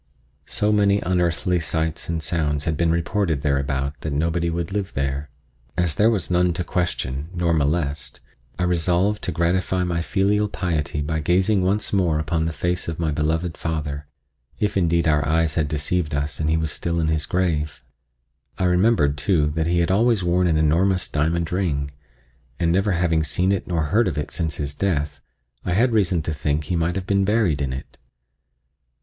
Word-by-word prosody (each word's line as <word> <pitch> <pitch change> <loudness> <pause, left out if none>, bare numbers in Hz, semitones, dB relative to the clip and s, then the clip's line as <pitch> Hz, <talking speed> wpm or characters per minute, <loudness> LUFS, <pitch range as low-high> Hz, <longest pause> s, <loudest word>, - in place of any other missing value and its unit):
So 105 +1 +1
many 100 -1 +3
unearthly 90 0 +1
sights 80 -1 -2
and 80 -1 -2
sounds 75 -3 -1
had 80 - 0
been 85 +2 +1
reported 85 -2 0
thereabout 70 0 -1
that 80 - -3
nobody 85 +3 0
would 85 +2 -3
live 100 -1 -3
there. 70 +2 -2 0.5
As 90 -3 +1
there 105 +7 +4
was 100 -6 -1
none 90 0 +3
to 90 - -2
question 80 -5 -2
nor 85 -1 +1
molest, 75 -1 -1 0.4
I - - -1
resolved 90 +4 +2
to - - -1
gratify 90 +2 0
my 85 -2 -1
filial 105 +4 +1
piety 75 -6 -2
by 80 +2 -2
gazing 95 +5 +2
once 100 +4 0
more 90 -6 +2
upon 80 +1 -1
the 80 - -1
face 90 +2 -2
of 80 -1 -3
my 80 -2 -1
beloved 80 +3 -1
father, 75 -3 -4 0.5
if 105 - 0
indeed 85 -3 +2
our 75 -2 +3
eyes 80 +2 +1
had 80 -1 0
deceived 75 +1 -1
us 75 0 -2
and 75 0 0
he 80 - +2
was 80 -1 -1
still 85 +2 -1
in 80 - +1
his 80 -1 0
grave. 80 -5 -1 0.7
I - - -1
remembered, 90 -6 +3
too, 75 -1 +2
that 80 +1 -1
he 85 0 +2
had 85 - +1
always 110 0 +3
worn 90 +1 +2
an 80 -2 +2
enormous 85 +5 +2
diamond 80 +3 -1
ring, 75 -7 -1 0.7
and 85 -1 +2
never 95 +3 +2
having 85 -3 +1
seen 90 +4 +1
it 100 - -1
nor 85 -3 0
heard 105 +9 +2
of 80 -5 -2
it 75 - -3
since 80 -4 -2
his 70 0 -3
death, 75 -6 -1 0.4
I 90 - -1
had 120 +6 +3
reason 95 -7 +2
to 80 - -2
think 75 0 -1
he 80 +4 -2
might 85 +1 0
have 95 -1 -3
been 100 0 +2
buried 95 -8 +1
in 70 -2 -1
it. 65 +1 -8
85 Hz, 190 wpm, -22 LUFS, 75-90 Hz, 0.7 s, there